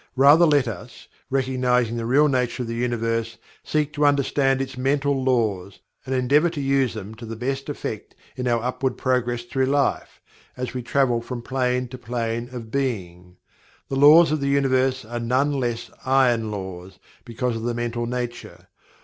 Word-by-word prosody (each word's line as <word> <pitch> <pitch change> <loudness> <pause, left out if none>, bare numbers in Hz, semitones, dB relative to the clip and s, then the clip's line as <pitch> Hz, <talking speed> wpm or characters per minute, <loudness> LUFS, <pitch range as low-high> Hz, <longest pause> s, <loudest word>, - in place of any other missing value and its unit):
Rather 145 +6 +6
let 145 -3 +3
us, - - -8 0.2
recognizing 125 -3 +1
the 115 -1 -3
real 145 +5 +4
nature 125 -2 0
of - - -6
the 115 - -4
Universe, 115 -1 -2 0.3
seek 150 -1 -1
to 150 - -1
understand 140 -1 +2
its 135 0 -4
mental 135 +1 0
laws, 110 -7 0 0.3
and 130 - -1
endeavor 140 +6 +3
to 155 - -6
use 135 -3 +1
them 105 0 -7
to 110 +2 -12
the 115 0 -6
best 135 +4 -3
effect 110 -7 -6 0.2
in 125 -1 -3
our 120 -1 +1
upward 130 +1 -2
progress 125 -2 0
through 130 +2 -1
life, 140 0 0 0.4
as 125 0 -4
we 125 - -3
travel 120 -1 +1
from 120 0 -6
plane 125 0 -1
to 125 +1 -10
plane 120 0 -3
of 115 -3 -8
being. 90 -10 -3 0.5
The 135 - -2
Laws 150 +4 +7
of 155 - 0
the 140 - 0
Universe 130 -2 +1
are 120 +2 -5
none 130 +5 +1
the 140 - -1
less 120 -3 -3
"Iron 125 -4 +2
Laws" 95 -3 -7 0.3
because 120 0 -3
of 115 - -4
the 120 +1 -2
mental 120 0 -2
nature. 120 -1 -6
125 Hz, 175 wpm, -23 LUFS, 115-135 Hz, 0.5 s, Laws